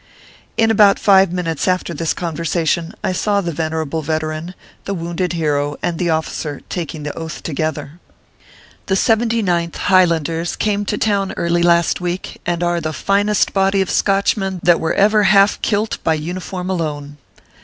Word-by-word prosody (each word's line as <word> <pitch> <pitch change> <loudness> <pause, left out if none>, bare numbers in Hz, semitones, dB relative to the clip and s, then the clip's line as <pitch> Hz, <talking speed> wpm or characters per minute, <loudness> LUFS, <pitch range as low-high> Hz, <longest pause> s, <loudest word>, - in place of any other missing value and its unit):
In 225 -1 +3
about 205 -2 +5
five 195 -3 +4
minutes 165 -4 -2
after 185 -1 0
this 165 +1 -1
conversation, 165 0 -2
I - - 0
saw 200 +2 +1
the 175 -3 -2
venerable 160 0 -2
veteran, 155 +3 -3 0.3
the 200 - -2
wounded 175 +1 -3
hero, 145 -3 0
and 170 -2 -1
the 175 - 0
officer 160 -2 -2
taking 160 -3 -5
the 145 - -5
Oath 160 -4 -7
together. 155 0 -4 0.9
The 190 - +1
Seventy 225 +2 +2
ninth, 170 -3 -1
Highlanders, 170 -3 +2
came 205 -1 -1
to 210 - -2
town 200 -3 0
early 170 0 +1
last 170 0 +3
week, 180 +1 -4
and 175 0 -1
are 175 0 0
the 155 0 -3
finest 205 +4 +1
body 195 0 +2
of 190 - 0
Scotchmen 195 -1 +1
that 175 -1 +4
were 160 - -1
ever 210 +1 +4
half 200 0 +4
kilt 215 0 -1
by 160 - +2
uniform 180 +3 -5
alone. 145 -4 -4
175 Hz, 160 wpm, -18 LUFS, 160-195 Hz, 0.9 s, about